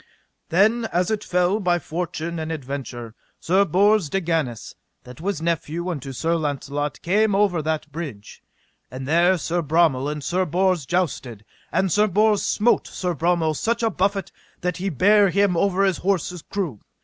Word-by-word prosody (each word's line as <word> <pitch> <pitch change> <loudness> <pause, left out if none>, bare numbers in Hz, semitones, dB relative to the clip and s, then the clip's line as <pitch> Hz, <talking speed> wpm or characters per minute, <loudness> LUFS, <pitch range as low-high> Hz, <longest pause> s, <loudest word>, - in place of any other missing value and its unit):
Then 220 +7 +3
as 180 -2 0
it 215 -1 -1
fell 180 +3 +1
by 175 -3 +2
fortune 170 0 -4
and 160 0 -4
adventure, 130 -6 -6 0.3
Sir 190 +4 +3
Bors 200 -2 +3
de 195 - 0
Ganis, 160 - -2 0.3
that 125 +3 -12
was 185 -3 -2
nephew 170 +1 -2
unto 140 -6 -5
Sir 165 +6 0
Launcelot, 145 -1 -3
came 205 +3 +2
over 195 -5 +2
that 155 -1 -3
bridge; 140 -10 -8 0.5
and 130 +1 -7
there 175 +4 +4
Sir 170 +1 -1
Bromel 155 -3 +2
and 150 -1 -6
Sir 185 +5 0
Bors 180 -3 +1
jousted, 130 - -2 0.3
and 190 -1 +1
Sir 210 +4 +3
Bors 210 +2 +3
smote 225 +3 +1
Sir 180 -1 -3
Bromel 165 0 +1
such 230 +9 -1
a 225 - +2
buffet 195 0 -1 0.3
that 180 -1 -2
he 190 +2 -2
bare 200 - +4
him 200 -1 +2
over 195 +2 +2
his 190 -2 +2
horse's 180 -2 -1
croup. 170 - -4
175 Hz, 165 wpm, -23 LUFS, 150-195 Hz, 0.5 s, there